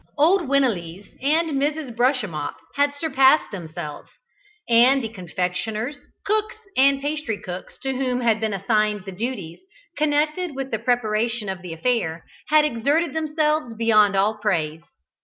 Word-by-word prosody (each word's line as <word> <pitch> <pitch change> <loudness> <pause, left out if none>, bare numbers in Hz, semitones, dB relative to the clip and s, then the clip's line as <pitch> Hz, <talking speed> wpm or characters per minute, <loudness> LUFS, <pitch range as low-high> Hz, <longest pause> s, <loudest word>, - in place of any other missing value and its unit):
Old 335 +3 +3
Winelees 200 -9 0
and 300 0 +1
Mrs. 290 -4 -2
Brushemup 230 - 0 0.2
had 285 0 +1
surpassed 285 -1 +3
themselves, 160 -6 -7 0.6
and 245 +3 +5
the 225 - -3
confectioners, 210 - -3 0.3
cooks 430 +1 0 0.2
and 275 +1 +4
pastrycooks 225 -12 -4
to 265 0 -1
whom 250 -1 -1
had 225 -2 +2
been 220 -1 -1
assigned 210 0 0
the 195 - -6
duties 190 -5 -5 0.4
connected 305 +2 0
with 270 0 -5
the 220 - -1
preparation 230 -2 0
of 190 -1 -4
the 180 -2 -8
affair, 170 -3 -1 0.2
had 305 0 +5
exerted 290 +4 +1
themselves 305 -5 0
beyond 215 -3 +4
all 210 +3 +1
praise. 165 -7 -1
240 Hz, 135 wpm, -23 LUFS, 205-285 Hz, 0.6 s, and